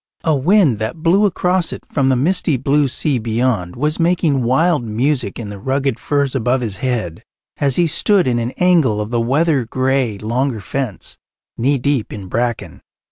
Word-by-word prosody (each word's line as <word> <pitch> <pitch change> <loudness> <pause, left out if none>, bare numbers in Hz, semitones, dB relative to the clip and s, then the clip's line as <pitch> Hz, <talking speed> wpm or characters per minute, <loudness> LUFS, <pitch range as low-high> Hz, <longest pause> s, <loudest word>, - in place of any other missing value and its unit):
A 160 -2 +2
wind 150 - +3
that 120 +9 -4
blew 195 +5 +4
across 180 -2 0
it - - -7
from 135 -3 0
the 130 - +3
misty 155 +2 +1
blue 140 +3 +2
sea 135 0 0
beyond 110 -5 -1
was 150 +4 -1
making 165 -5 +2
wild 145 +5 +2
music 120 0 -1
in 110 -4 -6
the 100 -1 -8
rugged 135 +2 -1
firs 140 -2 0
above 125 0 0
his 105 -5 -4
head 115 -10 -3 0.3
as 140 -3 0
he 175 - +3
stood 185 +3 +2
in 120 -2 +1
an 115 0 -2
angle 165 -12 +3
of 105 +2 -4
the 120 -1 +1
weather 140 +3 +1
grey 130 -2 -1
longer 115 +3 -2
fence, 120 +1 -5 0.4
knee 135 +4 +1
deep 135 -2 -1
in 100 -3 -7
bracken. 120 +5 -3
130 Hz, 180 wpm, -18 LUFS, 115-150 Hz, 0.4 s, blew